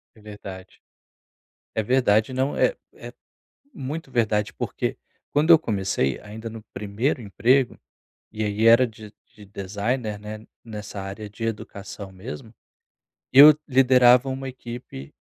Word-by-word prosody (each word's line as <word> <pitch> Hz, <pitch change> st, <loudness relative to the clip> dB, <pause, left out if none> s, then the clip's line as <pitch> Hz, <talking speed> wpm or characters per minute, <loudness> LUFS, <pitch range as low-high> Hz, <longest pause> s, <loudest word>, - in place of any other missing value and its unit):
É 110 Hz, -, -19 dB
verdade. 100 Hz, -3 st, -11 dB, 0.9 s
É 110 Hz, -, 0 dB
verdade, 110 Hz, -1 st, +2 dB
não, 130 Hz, +2 st, -1 dB
é -, -, +2 dB, 0.2 s
é -, -, -11 dB, 0.6 s
muito 140 Hz, -, -6 dB
verdade, 105 Hz, -4 st, 0 dB
porque -, -, -3 dB, 0.3 s
quando 150 Hz, +3 st, +3 dB
eu 165 Hz, -, +9 dB
comecei 95 Hz, -, -1 dB
ainda 110 Hz, +2 st, -8 dB
no 115 Hz, 0 st, -9 dB
primeiro 105 Hz, +7 st, -2 dB
emprego, 120 Hz, +5 st, +2 dB, 0.5 s
e 110 Hz, 0 st, -3 dB
aí 105 Hz, +1 st, 0 dB
era 115 Hz, +3 st, +7 dB
de 110 Hz, -1 st, -13 dB, 0.2 s
de 105 Hz, -, -15 dB
designer, 105 Hz, +3 st, -3 dB
né, 105 Hz, +1 st, -8 dB, 0.2 s
nessa 105 Hz, -2 st, -7 dB
área 100 Hz, +2 st, -7 dB
de 110 Hz, +3 st, -9 dB
educação 100 Hz, -2 st, -6 dB
mesmo, 110 Hz, +4 st, -9 dB, 0.8 s
eu 145 Hz, +3 st, +10 dB
liderava 125 Hz, -1 st, +5 dB
uma 135 Hz, 0 st, -4 dB
equipe 120 Hz, -, -9 dB
110 Hz, 130 wpm, -24 LUFS, 105-130 Hz, 0.9 s, eu